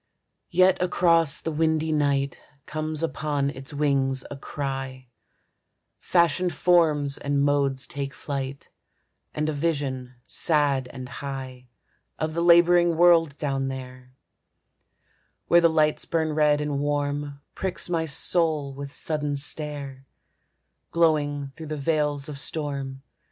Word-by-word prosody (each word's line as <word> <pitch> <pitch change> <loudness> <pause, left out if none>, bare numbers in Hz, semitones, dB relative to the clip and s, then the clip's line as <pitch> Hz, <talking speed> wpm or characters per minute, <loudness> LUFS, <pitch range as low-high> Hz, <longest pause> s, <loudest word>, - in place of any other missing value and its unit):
Yet 185 +1 +3
across 165 -4 +3
the 165 - -4
windy 160 0 0
night 140 -2 +1 0.3
Comes 155 0 -3
upon 145 -3 -1
its 135 -1 -8
wings 135 -3 0
a - - -5
cry; 135 -2 -5 0.9
Fashioned 170 0 +1
forms 150 -5 +3
and 140 0 0
modes 140 -2 +1
take 140 +1 -5
flight, 140 -1 -5 0.7
And 150 0 -1
a 155 - -1
vision 140 -5 -2
sad 145 -5 +1
and 130 -1 -8
high 130 -1 -7 0.5
Of 155 0 -2
the 170 - -1
laboring 170 0 +5
world 165 -4 +4
down 135 -2 -2
there, 130 -1 -8 1.3
Where 170 - +5
the 170 - +5
lights 155 -1 +1
burn 160 -2 -1
red 150 -1 +3
and 145 -1 -2
warm, 145 0 -2
Pricks 190 -2 -1
my 165 -2 -1
soul 150 -1 +2
with 140 0 -7
sudden 150 -1 0
stare, 140 -2 -3 0.8
Glowing 145 -4 +1
through 160 -1 -9
the 155 0 -4
veils 150 -1 0
of 145 -2 -6
storm. 140 -3 -4
145 Hz, 125 wpm, -25 LUFS, 140-160 Hz, 1.3 s, laboring